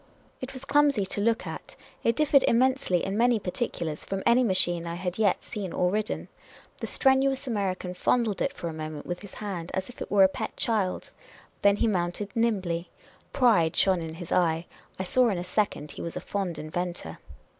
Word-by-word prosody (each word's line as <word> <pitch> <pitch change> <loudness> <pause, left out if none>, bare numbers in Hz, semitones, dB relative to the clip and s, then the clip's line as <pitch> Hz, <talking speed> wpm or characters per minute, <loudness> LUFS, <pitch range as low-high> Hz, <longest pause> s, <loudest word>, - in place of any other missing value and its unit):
It 260 +1 -5
was 260 0 -7
clumsy 280 -7 +3
to 205 - -2
look 230 +1 +1
at. - - -7 0.3
It 230 - +2
differed 285 -1 +4
immensely, 255 -7 +2
in 195 - -2
many 240 +1 +4
particulars, 180 -6 -3
from 195 0 -4
any 235 +2 +5
machine 175 -5 +2
I 170 - -3
had 180 +2 -4
yet 205 -3 +2
seen 200 -5 -5
or 180 0 +1
ridden. 215 +2 -2 0.5
The - - -3
strenuous 270 0 +2
American 190 -6 -2
fondled 220 +1 +1
it - - +1
for 170 - -6
a 165 - -4
moment 155 -1 -6
with 175 0 -4
his 205 -2 -11
hand, 185 -5 -5
as 190 +2 -3
if 245 - -13
it - - -4
were 200 -1 +6
a - - +8
pet 190 - -5
child. 210 -5 -1 0.5
Then 200 0 +5
he 220 - +1
mounted 190 0 -2
nimbly. 190 -7 0 0.4
Pride 205 -11 +3
shone 190 -3 +3
in 160 -1 -6
his 175 0 -8
eye. 165 -1 +2 0.3
I 190 - -2
saw 245 +6 +3
in 195 - -1
a 175 - -3
second 180 -6 -1
he - - -8
was 170 - -5
a - - -2
fond 190 -5 -3
inventor. 165 - -4
195 Hz, 200 wpm, -27 LUFS, 175-230 Hz, 0.5 s, a